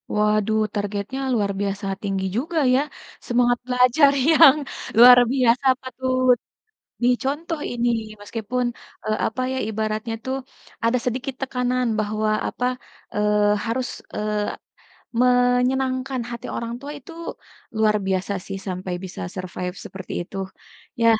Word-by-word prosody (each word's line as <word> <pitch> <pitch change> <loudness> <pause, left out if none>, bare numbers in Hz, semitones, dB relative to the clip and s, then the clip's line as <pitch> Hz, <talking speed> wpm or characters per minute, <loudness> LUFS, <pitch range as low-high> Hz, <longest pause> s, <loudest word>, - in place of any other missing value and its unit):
Waduh, 210 +1 +2 0.2
targetnya 205 +5 -3
luar 205 -4 +1
biasa 200 0 -2 0.2
tinggi 195 -1 -1
juga 325 +6 -2 0.2
ya 265 - +4 0.5
semangat 245 0 +3
belajar 250 +3 +5 0.2
yang 310 -3 +8 0.4
luar 245 +1 +10
biasa 255 0 +3 0.2
patut, 255 -1 +1 0.7
dicontoh 285 +6 0
ini 240 0 0 0.3
meskipun, 230 +4 -2 0.4
eee, 215 0 0
apa 240 +4 -3
ya - - -2
ibaratnya 220 +1 -2
tuh, 260 +1 -1 0.5
ada 230 +2 +3
sedikit 255 +2 -2
tekanan 250 -1 0
bahwa 215 0 0 0.2
apa, 250 - -3 0.5
eee, 210 0 +3
harus, 245 +2 -1 0.3
eee, 210 0 -1 0.7
menyenangkan 255 +1 +2
hati 235 -1 -6
orang 235 0 -3
tua 285 - -6
itu, 280 +5 -13 0.7
luar 215 -1 +4
biasa 190 +1 0
sih 195 0 -5
sampai 185 -1 -4
bisa 180 - -7
survive 180 0 -5
seperti 190 0 -9
itu, 180 - -11 0.6
ya. 230 - +4
240 Hz, 120 wpm, -23 LUFS, 210-255 Hz, 0.7 s, luar